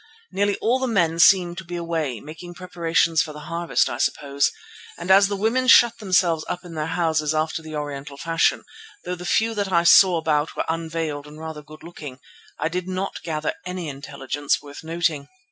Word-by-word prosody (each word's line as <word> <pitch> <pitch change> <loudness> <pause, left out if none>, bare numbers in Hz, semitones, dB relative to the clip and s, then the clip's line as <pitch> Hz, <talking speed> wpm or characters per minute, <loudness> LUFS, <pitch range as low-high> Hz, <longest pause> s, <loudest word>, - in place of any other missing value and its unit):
Nearly 205 0 +1
all 245 +4 +1
the 260 - -1
men 170 -8 +1
seemed 175 -1 +5
to - - -8
be 175 0 -7
away, 165 -8 -2
making 165 +5 -10
preparations 170 -3 +1
for 155 - -4
the 150 - -10
harvest, 170 +3 0
I - - -5
suppose, 140 -1 0 0.5
and 175 +2 -2
as 195 +1 +7
the 200 - -2
women 225 +6 0
shut 235 -2 +6
themselves 180 -6 +2
up 180 - -4
in 175 - -9
their 155 -1 -3
houses 160 -2 0
after 155 +1 -1
the 155 -1 -8
Oriental 145 -1 -6
fashion, 165 +2 +1 0.4
though 180 - -3
the 180 0 -7
few 225 +1 +2
that 200 -3 -2
I 170 -1 +3
saw 180 +1 +7
about 155 -1 0
were - - -2
unveiled 160 -3 -3
and 150 +1 -12
rather 160 -1 -7
good 155 +1 -15
looking, 150 -6 -9 0.4
I - - -1
did 180 +2 -4
not 185 +1 -4
gather 155 -2 -2
any 180 -3 -5
intelligence 140 0 -3
worth 145 +1 -11
noting. 160 -3 -1
165 Hz, 195 wpm, -23 LUFS, 150-180 Hz, 0.5 s, as